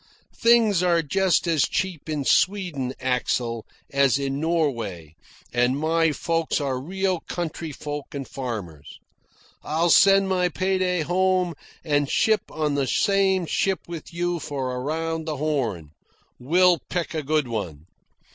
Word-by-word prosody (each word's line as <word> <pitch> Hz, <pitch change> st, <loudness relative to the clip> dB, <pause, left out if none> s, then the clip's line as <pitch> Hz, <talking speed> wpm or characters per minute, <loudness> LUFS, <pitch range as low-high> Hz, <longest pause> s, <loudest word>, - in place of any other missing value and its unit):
Things 230 Hz, -5 st, +5 dB
are 170 Hz, -2 st, +2 dB
just 190 Hz, +5 st, +1 dB
as 165 Hz, -4 st, +2 dB
cheap 180 Hz, -5 st, -3 dB
in 150 Hz, -3 st, -2 dB
Sweden, 175 Hz, -11 st, +1 dB
Axel, 125 Hz, -2 st, -1 dB, 0.2 s
as 140 Hz, -1 st, +3 dB
in 140 Hz, 0 st, -2 dB
Norway, 115 Hz, -, -1 dB, 0.4 s
and 125 Hz, +3 st, +2 dB
my 165 Hz, +1 st, +2 dB
folks 165 Hz, +2 st, -1 dB
are 135 Hz, -3 st, -2 dB
real 190 Hz, +3 st, -1 dB
country 165 Hz, -2 st, -4 dB
folk 145 Hz, 0 st, -6 dB
and 135 Hz, -3 st, -5 dB
farmers. 105 Hz, -, -6 dB, 0.6 s
I'll 165 Hz, +2 st, +1 dB
send 195 Hz, 0 st, +6 dB
my 180 Hz, -1 st, +1 dB
pay 190 Hz, +3 st, -1 dB
day 180 Hz, -2 st, +1 dB
home 185 Hz, +1 st, +1 dB, 0.3 s
and 145 Hz, -3 st, +1 dB
ship 220 Hz, -1 st, +3 dB
on 150 Hz, -2 st, -1 dB
the 140 Hz, -2 st, 0 dB
same 190 Hz, +4 st, +2 dB
ship 190 Hz, +3 st, 0 dB
with 170 Hz, -2 st, -8 dB
you 175 Hz, 0 st, -1 dB
for 135 Hz, -4 st, -4 dB
around 160 Hz, +4 st, -3 dB
the 155 Hz, -2 st, -3 dB
Horn. 120 Hz, -, -2 dB, 0.5 s
We'll 175 Hz, +6 st, +4 dB
pick 175 Hz, -2 st, -2 dB
a 160 Hz, -, -1 dB
good 150 Hz, -1 st, 0 dB
one." 90 Hz, -10 st, -5 dB
155 Hz, 140 wpm, -24 LUFS, 135-180 Hz, 0.6 s, send